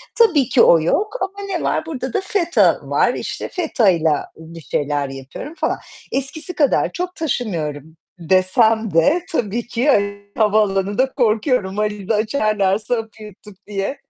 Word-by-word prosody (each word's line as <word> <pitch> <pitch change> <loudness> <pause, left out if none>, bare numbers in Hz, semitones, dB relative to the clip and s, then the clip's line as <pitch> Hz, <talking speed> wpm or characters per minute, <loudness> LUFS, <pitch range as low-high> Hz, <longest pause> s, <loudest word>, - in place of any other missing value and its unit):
Tabii 345 - +4
ki 250 - +4
o 170 - +6
yok. 410 - 0
Ama 395 +1 -4
ne 365 -4 -3
var? 315 - 0
Burada 260 -6 -5
da - - +1
feta 355 -4 +2
var. - - +1
İşte, - - -5
fetayla 190 - +1
bir 165 +1 -11
şeyler 145 -2 -2
yapıyorum 135 - -8
falan. - - -1 0.3
Eskisi 280 +5 -3
kadar 290 -4 +2
çok 360 0 -4
taşımıyorum 160 - -3 0.2
desem 190 +5 +2
de 285 - +3
tabii 235 -4 -2
ki 245 +5 0 0.5
havaalanında 210 +3 +1
korkuyorum 220 -4 +1
valizi 210 0 -1
açarlarsa 215 -1 0
hapı 220 -1 -8
yuttuk 210 -1 -13
diye. 200 +6 -3
215 Hz, 135 wpm, -19 LUFS, 190-280 Hz, 0.5 s, o